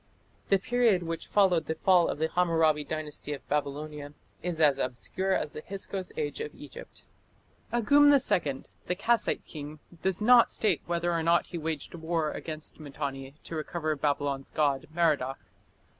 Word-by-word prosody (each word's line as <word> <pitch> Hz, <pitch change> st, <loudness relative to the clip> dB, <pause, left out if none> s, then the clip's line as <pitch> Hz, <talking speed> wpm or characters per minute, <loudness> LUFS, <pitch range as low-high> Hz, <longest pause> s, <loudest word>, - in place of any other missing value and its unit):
The 195 Hz, -, +5 dB
period 225 Hz, -3 st, +2 dB
which 165 Hz, 0 st, -5 dB
followed 180 Hz, -6 st, +3 dB
the 160 Hz, -, -1 dB
fall 180 Hz, +1 st, +4 dB
of -, -, -2 dB
the 160 Hz, +1 st, +1 dB
Hammurabi 165 Hz, -3 st, +2 dB
Dynasty 150 Hz, 0 st, -4 dB
of 140 Hz, -, -9 dB
Babylonia 145 Hz, 0 st, -3 dB, 0.3 s
is 175 Hz, -2 st, -3 dB
as 145 Hz, -3 st, +4 dB
obscure 185 Hz, +10 st, -1 dB
as 150 Hz, -, -1 dB
the -, -, -6 dB
Hyksos 195 Hz, +1 st, -5 dB
Age 450 Hz, -1 st, -3 dB
of 450 Hz, -, -6 dB
Egypt. -, -, -11 dB, 0.7 s
Agum 285 Hz, +5 st, +5 dB
II, 175 Hz, -, +2 dB, 0.2 s
the 180 Hz, -, 0 dB
Kassite 225 Hz, +4 st, +1 dB
king, 150 Hz, 0 st, -8 dB, 0.2 s
does 190 Hz, -2 st, +1 dB
not 235 Hz, +2 st, +6 dB
state 215 Hz, -, +1 dB
whether 170 Hz, 0 st, 0 dB
or 165 Hz, -, 0 dB
not 170 Hz, +1 st, +3 dB
he 175 Hz, -, -6 dB
waged 160 Hz, -2 st, -4 dB
war 165 Hz, -2 st, -1 dB
against 155 Hz, -1 st, -7 dB
Mitanni 140 Hz, -2 st, -6 dB
to 165 Hz, -, -7 dB
recover 155 Hz, 0 st, -2 dB
Babylon's 140 Hz, -1 st, -1 dB
god 145 Hz, -3 st, 0 dB
Merodach. 150 Hz, -6 st, +1 dB
160 Hz, 160 wpm, -29 LUFS, 150-190 Hz, 0.7 s, not